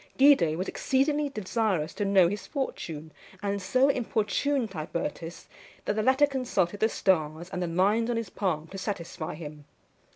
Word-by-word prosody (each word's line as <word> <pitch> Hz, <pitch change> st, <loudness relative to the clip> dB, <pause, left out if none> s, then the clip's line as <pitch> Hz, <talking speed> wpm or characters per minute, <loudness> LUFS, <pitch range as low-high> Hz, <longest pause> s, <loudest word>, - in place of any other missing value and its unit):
Guido 265 Hz, -, +5 dB
was 185 Hz, +2 st, -2 dB
exceedingly 290 Hz, +2 st, +1 dB
desirous 210 Hz, -, -1 dB
to 205 Hz, -, -2 dB
know 195 Hz, -3 st, +5 dB
his 205 Hz, +4 st, -4 dB
fortune, 160 Hz, -, -4 dB, 0.3 s
and 200 Hz, 0 st, -1 dB
so 255 Hz, +8 st, +3 dB
importuned 240 Hz, 0 st, 0 dB
Tibertus, 165 Hz, 0 st, -5 dB, 0.4 s
that 205 Hz, -, 0 dB
the 215 Hz, -, +1 dB
latter 260 Hz, +5 st, +5 dB
consulted 240 Hz, -9 st, -1 dB
the 220 Hz, -, +3 dB
stars 165 Hz, -3 st, 0 dB
and 180 Hz, -, -3 dB
the 175 Hz, -, 0 dB
lines 200 Hz, +7 st, +2 dB
on 240 Hz, -, 0 dB
his 230 Hz, -5 st, -4 dB
palm 165 Hz, -6 st, -1 dB
to 195 Hz, -, -7 dB
satisfy 175 Hz, -5 st, -4 dB
him. 150 Hz, -2 st, -9 dB
200 Hz, 160 wpm, -28 LUFS, 170-240 Hz, 0.4 s, Guido